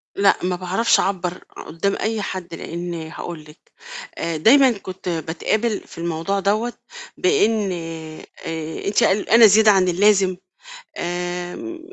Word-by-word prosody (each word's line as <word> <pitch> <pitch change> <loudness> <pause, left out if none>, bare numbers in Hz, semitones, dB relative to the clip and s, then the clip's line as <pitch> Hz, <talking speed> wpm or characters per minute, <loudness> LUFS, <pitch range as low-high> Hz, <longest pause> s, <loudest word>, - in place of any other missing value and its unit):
لأ، 200 0 +4
ما 180 0 0
باعرفش 185 +6 +2
أعبّر 180 -2 -2 0.2
قدّام 195 +5 -1
أي 220 -1 -1
حد، 185 -3 -6
لإن 170 +1 -5
هاقول 165 0 -7
لكِ، 150 +2 -19 0.5
آآ 165 -1 -2
دايماً 255 - +6
كنت 185 -1 -7
باتقابل 175 +7 -1
في - - -14
الموضوع 170 +4 -2
دوّة 215 +5 0 0.4
بإن 225 - +2 0.7
آآ 160 -1 -6
أنتِ 200 - +2
قلقانة 220 +4 +5
زيادة 215 +1 +6
عن 190 -2 +3
اللازم، 190 0 +3 0.6
آمم 180 - -4
185 Hz, 125 wpm, -21 LUFS, 170-215 Hz, 0.7 s, دايماً